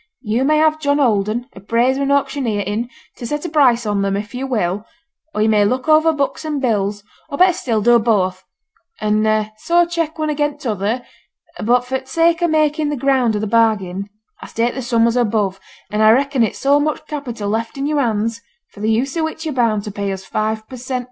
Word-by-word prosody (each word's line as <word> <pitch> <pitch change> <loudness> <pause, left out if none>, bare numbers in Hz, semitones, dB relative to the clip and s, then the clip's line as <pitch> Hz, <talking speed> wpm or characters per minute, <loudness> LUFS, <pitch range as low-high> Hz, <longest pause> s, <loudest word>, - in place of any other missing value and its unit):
You 225 +3 0
may 305 +3 +3
have 310 0 +3
John 285 -1 +1
Holden, 225 -2 +1
appraiser 235 +7 0
and 280 0 0
auctioneer, 270 -6 0
in 210 +5 -3 0.3
to 235 - -6
set 295 +4 -3
a - - -2
price 255 -6 +3
on 205 -1 0
them 195 0 0
if 210 +2 -6
yo' 260 +2 -4
will; 205 -5 -1 0.5
or 210 - +2
yo' - - +3
may 210 -2 +4
look 255 +7 -1
over 315 +1 +5
books 285 -1 -2
and 305 -2 -2
bills; 205 -5 -1 0.3
or, 280 - -4
better 365 0 +5
still, 230 - -1
do 240 +1 +5
both, 190 -5 0 0.6
and 215 0 +1
so 345 +5 +3
check 335 -2 -3
one 310 -1 -1
again 295 0 -1
t'other; 225 -2 -2 0.6
but 245 +3 +2
for 265 +1 -2
t' 265 - -20
sake 330 +4 +2
o' 345 - +3
making 310 -1 +1
the 295 - -1
ground 260 -4 +2
o' - - -1
the 215 - -2
bargain, 205 -3 +1 0.3
I - - -8
state 235 +1 -1
the 265 - -4
sum 235 -2 +2
as 235 0 +1
above; 210 -5 0 0.3
and 210 +1 0
I 215 - +6
reckon 270 +3 +3
it 225 - +1
so 280 +1 +3
much 305 +1 -2
capital 245 -9 -5
left 225 +4 -2
in 275 - -2
yo'r 295 -1 +1
hands 230 -1 -1 0.3
for - - -15
the 215 +1 -1
use 250 +6 0
o' 325 - 0
which 315 0 -4
yo're 310 - -2
bound 230 -5 +1
to 210 - -6
pay 200 0 -3
us 190 0 -6
five 220 0 -2
per 255 - -9
cent. 255 +1 -3
240 Hz, 220 wpm, -18 LUFS, 215-285 Hz, 0.6 s, I